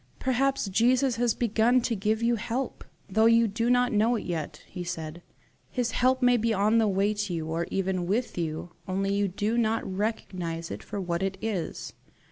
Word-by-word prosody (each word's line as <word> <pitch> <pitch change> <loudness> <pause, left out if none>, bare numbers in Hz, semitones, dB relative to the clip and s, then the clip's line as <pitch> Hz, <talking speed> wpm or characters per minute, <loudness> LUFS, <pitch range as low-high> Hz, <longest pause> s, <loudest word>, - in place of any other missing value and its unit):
"Perhaps 265 -2 +1
Jesus 245 +5 +3
has 240 -1 +2
begun 235 +2 +3
to 235 -1 -1
give 215 +3 0
you 235 0 +3
help, 235 +4 -3 0.2
though 220 +3 +3
you 230 0 +5
do 230 +3 -1
not 245 0 +3
know 220 +3 +3
it 225 - -4
yet," 165 -4 -4
he 180 - -7
said, 165 -1 -5 0.5
"His 245 -2 -1
help 255 +1 +2
may 245 0 +5
be 230 0 +1
on 210 +4 +3
the 220 - +3
way 200 +1 +2
to 205 -2 -3
you, 160 -1 -3
or 165 +2 -2
even 185 -2 -1
with 230 +6 -1
you, 165 0 -3 0.2
only 195 +1 0
you 200 0 +1
do 210 +5 -1
not 225 0 +1
recognize 185 -5 -3
it - - -5
for 205 - -6
what 175 -2 -2
it 195 0 -1
is. 210 -6 -4
210 Hz, 195 wpm, -27 LUFS, 185-235 Hz, 0.5 s, you